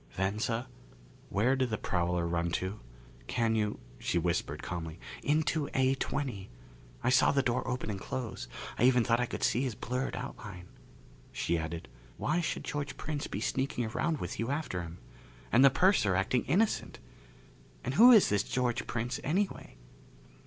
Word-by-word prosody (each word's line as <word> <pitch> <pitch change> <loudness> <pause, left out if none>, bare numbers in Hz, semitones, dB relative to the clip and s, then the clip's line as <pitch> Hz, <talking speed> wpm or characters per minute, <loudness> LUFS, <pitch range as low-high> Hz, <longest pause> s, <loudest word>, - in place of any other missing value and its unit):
"Venza, 110 +5 -1 0.6
where 120 +7 +2
did 130 -2 0
the 110 - -1
prowler 90 -2 0
run 85 0 0
to? 95 +4 -2 0.5
Can 115 -2 +1
you 105 -2 0
" - - -21
She - - 0
whispered 85 0 -1
calmly, 85 -1 -5 0.2
"Into 150 0 +1
A20. 130 -5 0 0.6
I 125 - +3
saw 130 +1 +5
the 140 -1 +2
door 125 0 0
open 125 -4 -2
and 100 - -4
close. 115 - -5 0.3
I 120 - +5
even 125 -2 +5
thought 115 0 +2
I 125 - +1
could - - -5
see 120 - +3
his 130 -5 -2
blurred 125 +5 -2
outline." 100 -8 -7 0.6
She 85 - 0
added, 80 +1 -4 0.3
"Why 175 - +1
should 150 - -2
George 145 -2 -4
Prince 150 -2 -3
be 100 - -4
sneaking 130 -1 -1
around 155 +8 -1
with - - -5
you 115 +2 -1
after 140 - -2
him? 85 0 -8 0.5
And 125 +4 +6
the 140 - +9
purser 145 - +3
acting 95 +6 +1
innocent? 205 +9 +1 0.9
And 125 - -2
who 240 - +9
is 220 -5 +7
this 100 -1 +3
George 125 +2 -1
Prince, 120 +2 -2
anyway?" 180 - -1
120 Hz, 165 wpm, -31 LUFS, 95-135 Hz, 0.9 s, the